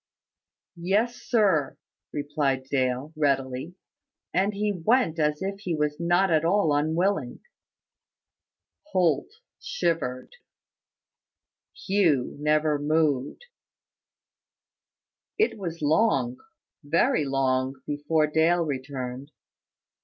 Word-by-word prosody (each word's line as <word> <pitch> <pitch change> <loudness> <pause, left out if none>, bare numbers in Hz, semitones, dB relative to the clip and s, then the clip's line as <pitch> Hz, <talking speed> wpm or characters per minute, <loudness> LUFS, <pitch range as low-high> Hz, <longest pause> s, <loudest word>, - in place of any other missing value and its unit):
"Yes, 215 +7 +1
sir," 195 - +1 0.3
replied 145 -2 -1
Dale, 130 +2 -1
readily; 135 +1 -1 0.6
and 195 +3 +2
he 210 +1 -1
went 180 -1 +1
as 150 +2 0
if 195 +1 -4
he 180 -5 -2
was 150 0 -1
not 175 +2 +2
at 155 -1 +3
all 170 -2 +2
unwilling. 160 -1 0 1.5
Holt 180 - +2 0.3
shivered. 165 - -2 1.5
Hugh 175 -10 +2
never 150 0 +2
moved. 150 - 0 1.9
It 425 - +1
was 170 -4 -5
long, 145 - +2 0.5
very 150 +1 +2
long, 135 -1 0
before 150 +2 +1
Dale 160 +3 +2
returned. 130 -1 -5
155 Hz, 85 wpm, -26 LUFS, 140-180 Hz, 1.9 s, at